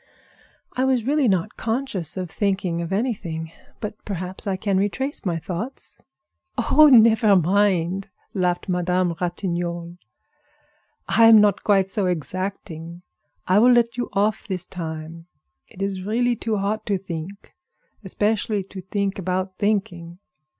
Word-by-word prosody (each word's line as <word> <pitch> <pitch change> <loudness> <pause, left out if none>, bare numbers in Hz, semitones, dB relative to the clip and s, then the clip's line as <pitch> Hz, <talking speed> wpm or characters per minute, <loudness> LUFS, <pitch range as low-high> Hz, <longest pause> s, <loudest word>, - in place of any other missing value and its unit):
I 255 - 0
was 260 -3 +2
really 285 0 +2
not 190 0 0
conscious 225 - -2
of 180 -3 -4
thinking 190 -4 -1
of 170 +1 -5
anything; 190 -7 -2 0.3
but 210 0 -6
perhaps 185 0 -4
I 190 -1 0
can 195 -1 0
retrace 265 +9 -2
my 170 -2 0
thoughts." 185 - -6 0.6
"Oh! 295 +6 +6
never 225 -3 +6
mind!" 190 +1 +2 0.2
laughed 180 -2 0
Madame 180 -1 +1
Ratignolle. 175 -1 -3 1.1
"I 230 - +5
am 225 -1 +9
not 205 -1 +3
quite 195 -2 +2
so 200 -2 0
exacting. 175 0 -4 0.4
I 185 +3 +5
will 245 +3 +6
let 235 -1 +3
you 245 - -3
off 205 +2 0
this 185 -3 -3
time. 165 -1 -7 0.4
It 195 - -7
is 195 -1 -2
really 240 +5 +1
too 220 -1 -2
hot 205 +2 -1
to 200 -2 +1
think, 185 +1 -8 0.5
especially 210 +1 0
to 190 0 -9
think 200 +1 -2
about 185 +1 -3
thinking." 175 -5 -1
195 Hz, 135 wpm, -23 LUFS, 175-215 Hz, 1.1 s, am